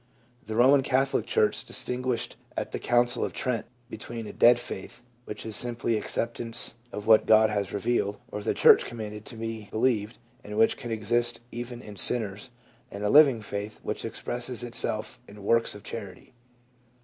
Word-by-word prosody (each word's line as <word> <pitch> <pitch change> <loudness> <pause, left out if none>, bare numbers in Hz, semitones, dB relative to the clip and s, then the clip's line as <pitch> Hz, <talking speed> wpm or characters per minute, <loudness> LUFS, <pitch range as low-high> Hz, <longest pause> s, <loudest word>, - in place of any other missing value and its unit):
The 110 +1 -6
Eoman 135 +4 +5
Catholic 135 +1 0
church - - +1
distinguished 125 -1 -2 0.2
at - - -3
the - - -4
Council 120 0 +2
of - - -3
Trent 125 -3 -2 0.2
between 115 -1 -7
a - - -8
dead 120 0 +6
faith, 95 -3 -8 0.2
which 105 - -7
is 110 -1 -5
simply 120 -1 -1
acceptance 115 +1 -2 0.2
of 105 -3 -6
what 110 -1 +5
God 110 0 +5
has 100 -2 -2
revealed, 100 0 -1
or 105 - -5
the - - -1
church - - +6
commanded 105 -2 -7
to - - -11
be 110 -2 -6
be - - -4
lieved, 115 -2 0 0.3
and 105 0 -7
which 110 0 +4
can 120 -3 -8
exist 115 +2 0
even 120 +1 -7
in 105 -1 -11
sinners, 105 +1 +2 0.4
and 100 +1 -7
a 105 - +1
living 140 -7 +6
faith, 105 +1 -6
which - - -4
expresses 120 -1 -3
itself 115 0 +2
in 100 0 -13
works 115 +1 +2
of 105 - -12
charity. 105 0 -8
115 Hz, 175 wpm, -27 LUFS, 105-120 Hz, 0.4 s, dead